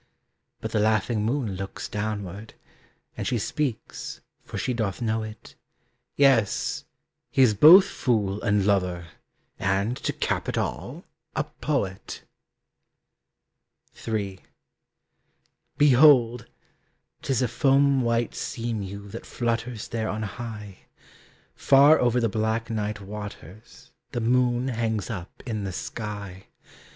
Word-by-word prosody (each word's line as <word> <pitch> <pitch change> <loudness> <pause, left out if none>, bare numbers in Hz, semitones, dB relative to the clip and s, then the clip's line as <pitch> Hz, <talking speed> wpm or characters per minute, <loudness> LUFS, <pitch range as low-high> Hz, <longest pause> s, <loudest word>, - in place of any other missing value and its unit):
But - - -4
the - - +1
laughing 110 +1 +1
moon 115 -3 -1
looks 95 0 -6
downward, 105 -1 -5 0.6
And - - -4
she 125 - +1
speaks, 130 +1 -3 0.2
for - - -7
she 125 - -1
doth 110 -6 -2
know 110 -2 0
it: 110 -1 -9 0.6
"Yes, 130 -7 +2 0.4
he 135 - +4
is 115 -4 +5
both 165 - +9
fool 105 - -1
and 105 -3 +1
lover, 90 -4 0 0.5
And, 100 +4 0
to - - -2
cap - - -2
it - - -2
all, - - -4 0.3
a - - +1
poet!" 125 -10 -4 1.8
III. 100 -4 -2 1.4
Behold! 125 -5 +5 0.7
'tis 130 -2 0
a - - +2
foam 135 +3 +3
white 115 0 0
sea 115 0 -4
mew 100 -1 -6
That 110 +3 -9
flutters 115 -1 -2
there 110 -1 -3
on 110 +2 -3
high. 105 -2 -7 0.7
Far 140 +3 +6
over 125 0 +2
the 115 - +2
black 110 +2 -1
night 105 -1 -3
waters 105 -1 -10 0.2
The 120 - -1
moon 125 +2 +2
hangs 110 -3 -2
up 90 -5 -8
in 110 -4 -3
the 95 - -3
sky. 100 -2 -6
110 Hz, 120 wpm, -25 LUFS, 100-125 Hz, 1.8 s, both